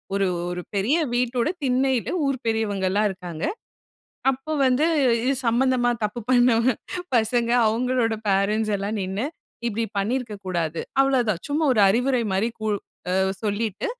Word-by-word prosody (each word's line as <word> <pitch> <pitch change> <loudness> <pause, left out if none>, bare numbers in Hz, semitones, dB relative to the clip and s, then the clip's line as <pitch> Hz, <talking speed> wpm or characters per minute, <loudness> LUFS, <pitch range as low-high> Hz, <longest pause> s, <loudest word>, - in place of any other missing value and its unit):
ஒரு 195 - +2 0.3
ஒரு 180 - -4
பெரிய 215 +11 +2 0.2
வீட்டோட 245 +3 +1 0.2
திண்ணையில 255 -3 +1 0.2
ஊர் 265 -2 -1
பெரியவங்க 205 -4 0
எல்லாம் 210 +2 +2
இருக்காங்க. 175 -2 -6 0.9
அப்போ 270 +4 -5
வந்து 255 +4 +3 0.4
இது 270 - +2
சம்பந்தமா 245 +1 +2
தப்பு 210 +3 -3
பண்ணவங்க 245 -1 +4 0.4
பசங்க, 235 +1 +1 0.2
அவுங்களோட 235 0 +1
பேரன்ட்ஸ் 210 +2 +1
எல்லாம் 205 +2 -3
நின்னு 195 +5 -2 0.4
"இப்டி 230 +1 -1
பண்ணியிருக்கக் 215 -1 -2
கூடாது" 170 -3 -2 0.2
அவ்வளவுதான். 245 -9 +2
சும்மா 300 +2 0
ஒரு 210 - +4
அறிவுரை 250 +4 +2
மாதிரி 210 +5 +1
கூ 220 - -2 0.7
சொல்லிட்டு, 210 -1 -2
225 Hz, 130 wpm, -24 LUFS, 200-250 Hz, 0.9 s, பண்ணவங்க